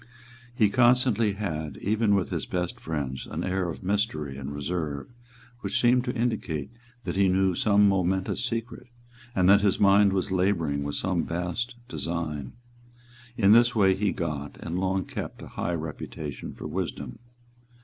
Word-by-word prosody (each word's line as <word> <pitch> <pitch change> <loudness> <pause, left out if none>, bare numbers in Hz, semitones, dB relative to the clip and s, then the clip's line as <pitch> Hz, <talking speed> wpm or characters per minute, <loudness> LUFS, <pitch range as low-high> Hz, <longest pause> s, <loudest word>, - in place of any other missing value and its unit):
He 105 -4 +3
constantly 120 -3 +4
had, 80 -8 -4
even 105 0 +2
with 95 -3 0
his - - -2
best 90 -1 -3
friends, 70 -5 -4
an - - -3
air 90 -1 -1
of 80 - -7
mystery 90 -8 -1
and 70 +1 -6
reserve 75 - -3 0.5
which 100 -3 -1
seemed 125 +1 +4
to 125 - -2
indicate 105 - -2 0.3
that - - -3
he 100 0 +4
knew 95 0 +3
some 105 +2 +4
momentous 95 0 +1
secret, 115 0 -4 0.5
and 90 -1 +3
that 100 +1 +7
his 100 -2 +2
mind 100 0 +6
was 95 0 -1
labouring 90 -6 +1
with 70 0 -3
some 95 -3 0
vast 90 +9 -3
design. 80 - -3 0.8
In 100 -3 +5
this 120 +2 +6
way 95 -3 +5
he 100 +1 0
got 75 -5 -4
and 85 +2 -3
long 95 0 0
kept - - -6
a - - -9
high 85 - -2
reputation 80 -1 -6
for - - -9
wisdom. 70 -4 -4
95 Hz, 160 wpm, -27 LUFS, 80-105 Hz, 0.8 s, that